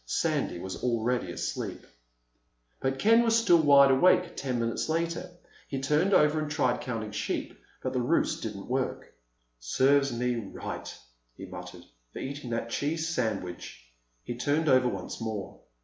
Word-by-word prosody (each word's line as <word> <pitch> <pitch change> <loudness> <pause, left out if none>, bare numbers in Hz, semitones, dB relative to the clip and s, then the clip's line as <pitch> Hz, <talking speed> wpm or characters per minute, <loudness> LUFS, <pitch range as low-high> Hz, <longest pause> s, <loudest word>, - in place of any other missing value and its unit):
Sandy 85 - 0
was 95 +2 -6
already 120 -4 0
asleep. - - -4 0.9
But 135 0 -1
Ken 225 +8 +5
was 230 -1 +3
still 175 -8 +5
wide 140 -2 +7
awake 180 +6 +4
ten 130 -3 -2
minutes 115 +4 -1
later. 170 +2 -1 0.4
He 135 - -3
turned 150 +8 +2
over 150 -4 +4
and 155 -1 -3
tried 145 -5 +1
counting 115 -4 -4
sheep, 105 - -3 0.3
but 130 - -2
the 125 - 0
ruse 125 +7 +1
didn't 105 -3 -5
work. 130 +1 -3 0.5
"Serves 140 - +3
me 120 +1 -1
right," 105 -4 -6 0.5
he - - -7
muttered, - - -9 0.3
"for - - -9
eating 140 -2 -5
that 115 0 -3
cheese 160 +5 -1
sandwich." 100 - -4 0.3
He 120 - -4
turned 145 +6 0
over 130 -2 +5
once 100 -1 -5
more. 110 -3 -5
130 Hz, 150 wpm, -28 LUFS, 115-150 Hz, 0.9 s, wide